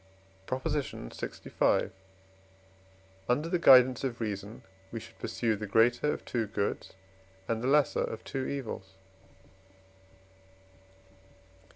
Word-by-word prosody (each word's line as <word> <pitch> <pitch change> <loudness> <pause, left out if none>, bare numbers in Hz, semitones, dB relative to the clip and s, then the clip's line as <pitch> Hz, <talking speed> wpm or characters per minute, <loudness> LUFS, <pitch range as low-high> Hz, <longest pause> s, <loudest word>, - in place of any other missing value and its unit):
PROP. 130 0 -3
LXV. 145 - -1 1.4
Under 150 +7 +1
the 175 - +1
guidance 130 -4 +7
of 125 -3 -2
reason 105 0 -5 0.3
we 115 - -4
should - - -14
pursue 115 -2 -1
the 105 0 -5
greater 120 +7 +3
of - - -5
two 115 -3 -1
goods 100 -1 -3 0.5
and 115 -1 -1
the 125 - -1
lesser 145 +1 +3
of 110 - -5
two 135 -1 -3
evils. 110 -8 -5
120 Hz, 105 wpm, -30 LUFS, 110-135 Hz, 1.4 s, guidance